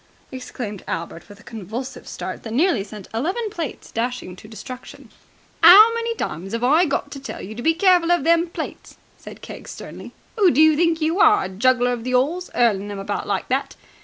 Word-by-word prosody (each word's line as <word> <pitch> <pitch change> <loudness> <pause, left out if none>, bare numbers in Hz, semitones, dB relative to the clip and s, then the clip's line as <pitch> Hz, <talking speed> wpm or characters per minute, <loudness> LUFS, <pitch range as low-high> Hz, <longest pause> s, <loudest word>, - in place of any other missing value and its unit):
exclaimed 245 -6 -7
Albert 165 +2 -6
with 205 0 -14
a - - -17
convulsive 225 +4 -7
start - - -6
that 225 - -8
nearly 280 - +2
sent 205 -1 -11
eleven 365 - -2
plates 330 -8 -6
dashing 230 -6 -4
to 200 - -14
destruction. 250 +3 -11 0.5
"'Ow 400 +7 +9
many 465 0 -2
times 185 - -5
have 230 +1 -2
I 310 +8 +4
got 285 - -2
to 275 - -7
tell 270 - -8
you 205 - -8
to 235 - -7
be 325 +5 +2
careful 355 -2 +3
of 350 - +2
them 335 +1 +3
plates?" 335 - -8 0.2
said - - -12
Keggs - - -10
sternly. - - -10 0.3
"Who 390 -3 +6
do 270 - +1
you 315 0 +6
think 335 0 +1
you 325 +5 0
are 415 +1 +5
a - - -4
juggler 245 +5 +2
on 245 -2 -3
the 255 +2 -2
'Alls, 320 +8 0
'urling 210 -5 +2
them 205 -1 -6
about 195 - -4
like - - -2
that? - - -1
255 Hz, 205 wpm, -21 LUFS, 220-335 Hz, 0.5 s, Ow